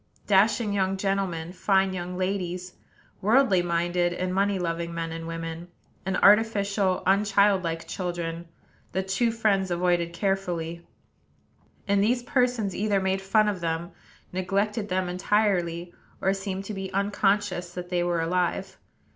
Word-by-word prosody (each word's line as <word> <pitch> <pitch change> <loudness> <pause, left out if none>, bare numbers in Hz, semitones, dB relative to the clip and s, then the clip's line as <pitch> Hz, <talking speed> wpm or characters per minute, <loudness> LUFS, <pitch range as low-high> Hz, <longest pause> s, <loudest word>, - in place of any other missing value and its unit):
Dashing 210 +2 +3
young 195 -1 0
gentlemen, 190 -4 -2
fine 190 0 +2
young 180 0 -5
ladies, 185 -1 -2 0.5
worldly 215 -3 +4
minded 175 0 0
and 185 +1 -2
money 200 +1 +2
loving 170 -1 -3
men 165 -1 -3
and 165 0 -6
women, 165 +1 -5 0.4
and 190 - 0
artificial, 200 -3 +3
unchildlike 195 -4 +2
children, 170 -2 -4 0.5
the 190 - 0
two 195 +5 +1
friends 205 -4 +1
avoided 175 -1 +1
carefully; 170 -2 -2 1.0
and 200 0 +3
these 240 +3 +1
persons 245 -7 +1
either 205 -1 +1
made 190 0 0
fun 215 +2 +3
of 200 -4 -2
them, 165 +1 -2 0.4
neglected 200 +3 -1
them 185 0 0
entirely, 180 -2 0 0.3
or 190 - +2
seemed 195 0 -4
to 210 - -5
be 190 -1 -5
unconscious 200 -2 0
that 180 0 -6
they 175 -1 +1
were 175 -1 0
alive. 180 +3 -1
190 Hz, 135 wpm, -26 LUFS, 175-200 Hz, 1.0 s, worldly